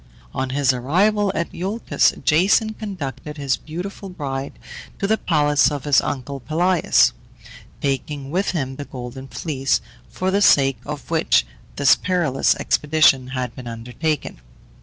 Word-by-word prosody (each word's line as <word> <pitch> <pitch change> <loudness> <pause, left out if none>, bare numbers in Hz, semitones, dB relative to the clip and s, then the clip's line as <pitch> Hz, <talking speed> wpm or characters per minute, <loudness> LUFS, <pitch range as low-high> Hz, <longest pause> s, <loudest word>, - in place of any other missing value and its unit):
On 130 - -2
his 135 0 +2
arrival 195 - +2
at 170 - -2
Iolcus, 200 +6 +1
Jason 205 +7 +3
conducted 150 - -6
his 140 -3 0
beautiful 185 +5 -7
bride 140 -6 -5 0.4
to - - -2
the 215 +2 +3
palace 150 -7 +2
of 145 -3 -4
his 145 -3 +4
uncle 140 +1 -4
Pelias, 170 +7 +3 0.7
taking 140 0 -3
with 190 +4 0
him 135 -6 -3
the 145 - -6
Golden 130 +1 -8
Fleece, 135 -2 -1 0.3
for 185 +1 -2
the 200 +1 +1
sake 135 - +4
of 150 +2 -7
which 160 - +3 0.3
this 140 -2 +5
perilous 175 -7 +1
expedition 150 -4 +3
had 130 -2 -4
been 125 -2 -9
undertaken. 120 - -3
145 Hz, 140 wpm, -21 LUFS, 135-180 Hz, 0.7 s, this